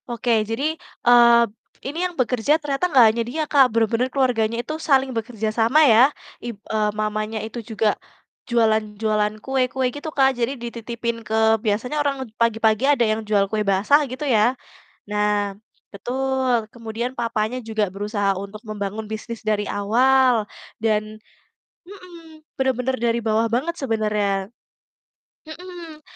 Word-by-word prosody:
Oke, 235 -1 +1
jadi, 280 +8 -1 0.3
eee, 235 -1 +7 0.4
ini 285 +4 -5
yang 360 - -3
bekerja 255 +4 +2
ternyata 295 +3 -2
nggak 260 -7 +6
hanya 235 - -1
dia 300 +7 -3
Kak, 275 -3 +4
benar-benar 230 +2 +1
keluarganya 240 -4 0
itu 275 +6 -6
saling 270 -4 +2
bekerja 220 -1 -3
sama 235 +8 +4
ya, 245 +1 +6 0.3
ib 235 -3 -6 0.2
eee, 215 -1 +1
mamanya 215 +1 -2
itu 230 +2 -6
juga, 220 -1 0 0.6
jualan 220 -3 +1
jualan 210 -1 +1
kue-kue 260 -1 0
gitu 290 +2 -5
Kak, 265 -1 +5
jadi 235 +3 0
dititipin 235 0 -4
ke 220 - -2 0.3
biasanya 225 +7 -1
orang 285 -1 0 0.3
pagi-pagi 225 0 +2
ada 275 -5 +3
yang 215 0 0
jual 200 -2 +3
kue 215 0 -1
basah 200 +9 +3
gitu 260 +4 -5
ya. 245 0 +2 0.5
Nah, 210 -1 0 0.4
betul 255 0 -1
kemudian 230 +1 -4
papanya 230 0 -1
juga 220 -3 -2
berusaha 205 0 -1
untuk 200 +2 -8
membangun 210 +1 -4
bisnis 220 +1 -6
dari 210 -1 0
awal 245 +2 +3 0.4
dan 215 -1 0 0.7
mhm, 345 -4 -14 0.2
benar-benar 260 -1 0
dari 235 0 +1
bawah 220 +1 +2
banget 305 +8 0
sebenarnya, 210 -5 -1 1.0
mhm. 335 -1 -10
235 Hz, 140 wpm, -22 LUFS, 215-265 Hz, 1.0 s, eee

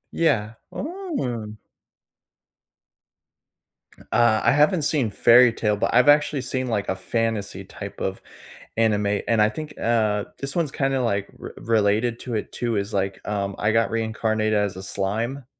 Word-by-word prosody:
Yeah. 120 -10 +1 0.2
Oh. 275 - -4 2.6
Uh, 115 -2 +4
I - - +4
haven't 150 +4 +3
seen 140 -6 +1
Fairytale, 115 0 +4
but 100 - -1
I've 125 +2 +5
actually 145 -1 +4
seen, 130 0 -3
like, 105 -4 -1
a - - -1
fantasy 100 0 -2
type 100 +1 -9
of 95 0 -3 0.6
anime, 105 -2 +1
and 115 -2 +3
I 105 - +4
think, 155 +4 -7
uh, 110 -3 +1
this 135 0 -5
one's 165 -5 0
kinda, 135 -2 0
like, 100 -4 -1
r - - -8
related 110 +1 +1
to 120 -3 -4
it, 105 - -4
too 120 -2 -2
is, 100 +2 -3
like, 95 -1 -2
um, 100 -1 -2
I 105 +1 +1
Got 115 0 +2
Reincarnated 110 -1 -1
as 105 -3 0
a 95 - -8
Slime. 115 +8 -3
115 Hz, 150 wpm, -23 LUFS, 105-125 Hz, 2.6 s, I've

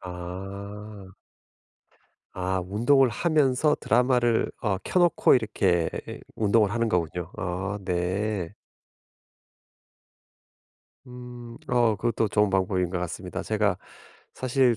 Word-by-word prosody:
아. 95 +3 -8 1.2
아 95 0 -1
운동을 120 +7 +3
하면서 150 +1 +2
드라마를 120 -1 +2
어 105 -4 +1
켜 185 - +1
놓고 175 -5 +5
이렇게 95 -7 +1 0.5
운동을 105 -1 +3
하는 115 +1 0
거군요. 90 -2 -1
아 95 +3 -3
네. 95 +1 -1 2.5
음 125 -1 -10
어 120 -3 +3
그것도 115 0 0
좋은 105 0 +2
방법인 95 -2 +1
것 90 - -2
같습니다. 90 +2 -5
제가 105 -3 +1 0.6
사실 130 -2 +2
105 Hz, 195 characters per minute, -26 LUFS, 95-120 Hz, 2.5 s, 놓고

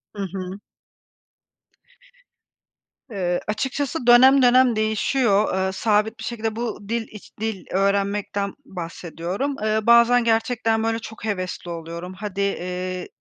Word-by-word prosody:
Hı 200 - -5
hı. 190 +1 -5 2.5
Eee, 180 -4 -1
açıkçası 265 +5 -2
dönem 260 +3 +7
dönem 250 -1 +5
değişiyor, 215 0 +1
eee, 190 - -1
sabit 215 +2 +1
bir - - -7
şekilde 225 -2 -3
bu 220 -3 -5
dil 230 -1 -1
iç 210 - -12
dil 220 -3 -3
öğrenmekten 200 +1 0
bahsediyorum. 175 - -4
Eee, 215 0 +2
bazen 235 +2 +5
gerçekten, 225 0 +1
böyle, 225 0 0
çok 220 -1 -9
hevesli 185 -4 -3
oluyorum. 170 +2 -7
"Hadi, 200 0 -5
eee, 185 -1 -3
215 Hz, 120 wpm, -23 LUFS, 190-235 Hz, 2.5 s, dönem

